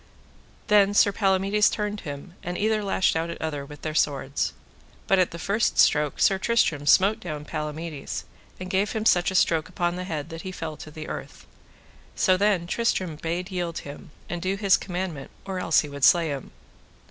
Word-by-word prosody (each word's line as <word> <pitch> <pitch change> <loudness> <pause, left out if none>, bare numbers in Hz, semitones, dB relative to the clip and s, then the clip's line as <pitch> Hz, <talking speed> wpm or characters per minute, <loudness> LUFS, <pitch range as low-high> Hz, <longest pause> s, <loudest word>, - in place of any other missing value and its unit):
Then 205 -1 +4
Sir 200 - +5
Palamides 195 +1 +2
turned 210 -1 -3
him, 145 +3 -8
and 175 +1 -4
either 215 0 +1
lashed 195 -3 +1
at 165 +1 -2
other 150 -3 -3
with 145 +1 -12
their 155 - -3
swords. 140 -3 0 0.5
But 195 - +3
at 180 - +3
the 170 - -8
first 200 +6 0
stroke 150 -1 +3
Sir 195 -1 +4
Tristram 165 -10 +1
smote 195 +6 +5
down 150 -4 -6
Palamides, 150 0 -5 0.3
and 185 - -6
gave 195 +2 0
him 220 -1 -2
such 175 -5 +4
a 190 - -5
stroke 165 -3 +2
upon 175 0 -1
the 180 - -4
head 160 -3 -4
that 165 -1 -7
he 185 - -6
fell 160 -4 -5
to - - -10
the 155 0 -8
earth. - - -8 0.7
So 185 - +3
then 195 -2 +2
Tristram 185 -4 -1
bade 175 +4 -3
yield 175 -3 -3
him, 145 0 -9 0.2
and 175 -1 -4
do 190 +2 0
his 195 -1 +4
commandment, 175 -6 -4 0.2
or 190 -1 -3
else 170 -3 +3
he 150 - -7
would 140 -1 -8
slay 170 +1 +5
him. 140 -2 -5
175 Hz, 190 wpm, -25 LUFS, 155-195 Hz, 0.7 s, Sir